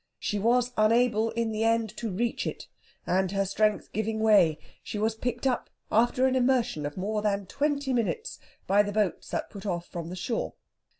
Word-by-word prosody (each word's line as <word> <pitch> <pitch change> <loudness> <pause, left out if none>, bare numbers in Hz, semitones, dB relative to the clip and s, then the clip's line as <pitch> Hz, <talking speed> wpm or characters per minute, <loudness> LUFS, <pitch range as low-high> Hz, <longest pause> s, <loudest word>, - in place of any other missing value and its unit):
She 210 - -2
was 245 +3 +2
unable 225 +1 +3
in 230 0 -1
the 215 0 -1
end 225 -2 +1
to 230 - -3
reach 230 +5 -1
it, - - -5 0.4
and 185 0 +1
her 195 0 +1
strength 210 +2 0
giving 220 +1 -1
way, 200 -8 +5 0.2
she - - -6
was 220 +2 +1
picked 240 +2 -3
up, 255 -2 0 0.2
after 240 +3 +3
an 260 0 +2
immersion 245 - +1
of 145 - -9
more 210 +3 -1
than 200 -1 0
twenty 285 +2 -1
minutes, 250 - -1 0.3
by 200 +2 +4
the 205 0 -2
boats 205 -5 -1
that - - -3
put 200 0 -8
off 175 -2 -2
from 170 -2 -6
the 180 - -5
shore. 225 +5 -3
220 Hz, 190 wpm, -28 LUFS, 200-240 Hz, 0.4 s, way